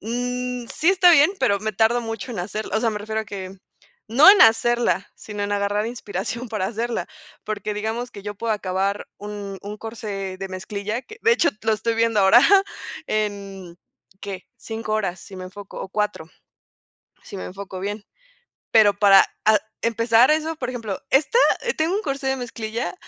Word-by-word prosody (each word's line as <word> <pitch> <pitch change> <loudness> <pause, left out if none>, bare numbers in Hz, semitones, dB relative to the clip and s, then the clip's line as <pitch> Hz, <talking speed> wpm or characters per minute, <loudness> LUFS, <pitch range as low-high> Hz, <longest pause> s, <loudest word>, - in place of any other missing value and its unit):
Mm, 245 +2 -3
mm, - - -14
sí 320 - +1
está 365 -2 +6
bien, 305 +2 +6
pero 200 - +2
me 215 0 -2
tardo 225 +4 +2
mucho 225 +3 -5
en 220 - -6
hacerla 210 +4 -3
O - - +1
sea, 230 - +1
me 210 - -4
refiero 220 +1 -3
a 220 - -6
que 195 -2 -7 0.5
no 270 - +7
en 410 - +7
hacerla, 230 -2 +3
sino 210 -1 -7
en 205 0 -2
agarrar 205 +1 0
inspiración 225 +1 -5
para 210 -4 -2
hacerla, 230 +3 -3 0.4
porque 210 -1 -4
digamos 220 +4 -3
que 200 - -11
yo 205 +1 -5
puedo 225 +2 -2
acabar 195 0 -2
un 205 -1 -7
un 210 +1 -7
corsé 205 -4 -5
de 195 0 -5
mezclilla, 200 +4 -4
que 435 +10 -13
de 460 - +5
hecho 340 -7 +3
lo 220 - +2
estoy 225 +2 -1
viendo 225 -2 +2
ahora 200 +6 +7 0.6
en, 200 -4 -4 0.4
¿qué?, 195 -2 -7
5 220 -1 -5
horas 195 -4 -1
si 190 - -11
me 185 - -7
enfoco 195 +2 -9
o - - -6
4, 210 -5 -2 1.0
si 200 - -9
me - - -6
enfoco 190 0 -8
bien. 205 +2 -4 0.7
Pero 215 -2 +6
para 195 -2 +7 0.2
a 215 0 +6 0.2
empezar 230 +2 +3
eso, 315 +1 +1
por 250 -5 -4
ejemplo, 225 -6 -4
esta, 305 - +3 0.2
eh, 475 - 0
tengo 320 +4 0
un 420 - -1
corsé 275 -5 -3
de 265 0 +1
mezclilla 230 -1 -4
215 Hz, 185 wpm, -22 LUFS, 200-240 Hz, 1.0 s, no